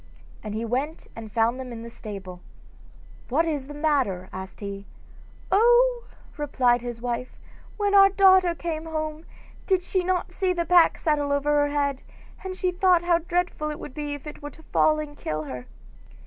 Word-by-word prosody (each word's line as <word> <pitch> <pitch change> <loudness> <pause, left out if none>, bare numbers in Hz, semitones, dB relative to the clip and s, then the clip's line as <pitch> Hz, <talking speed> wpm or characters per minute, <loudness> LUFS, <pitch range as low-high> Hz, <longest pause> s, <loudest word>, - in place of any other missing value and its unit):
And 210 -1 -6
he 225 +1 -2
went 270 +7 -2
and 220 -2 -8
found 230 +3 +1
them 255 -1 -6
in 230 -1 -7
the 235 - -8
stable. 195 -5 -8 0.9
'What 305 +7 +2
is 290 -5 -2
the 290 - -8
matter?' 270 - 0
asked 190 0 -8
he. 200 -1 -7 0.6
'Oh!' 480 +4 +4 0.3
replied 250 -5 +2
his 240 -1 -6
wife, 245 +1 -4 0.4
'when 410 -1 0
our 390 -1 +8
daughter 375 -3 +5
came 325 -1 -4
home, 310 0 -4 0.4
did 375 -2 +2
she 365 0 0
not 365 0 -1
see 370 -1 0
the 340 -1 -1
pack 345 0 +5
saddle 295 -2 0
over 285 +1 +1
her 290 -1 +2
head, 280 -2 0 0.4
and 375 -1 -5
she 365 -1 0
thought 360 -1 +3
how 345 -1 +3
dreadful 345 -2 -1
it 300 - -5
would - - -9
be 295 0 -4
if 290 - -12
it 300 0 -9
were 290 - -6
to 320 - -17
fall 310 0 +4
and 295 -1 -6
kill 155 0 -3
her. 125 -4 -7
295 Hz, 185 wpm, -25 LUFS, 245-350 Hz, 0.9 s, our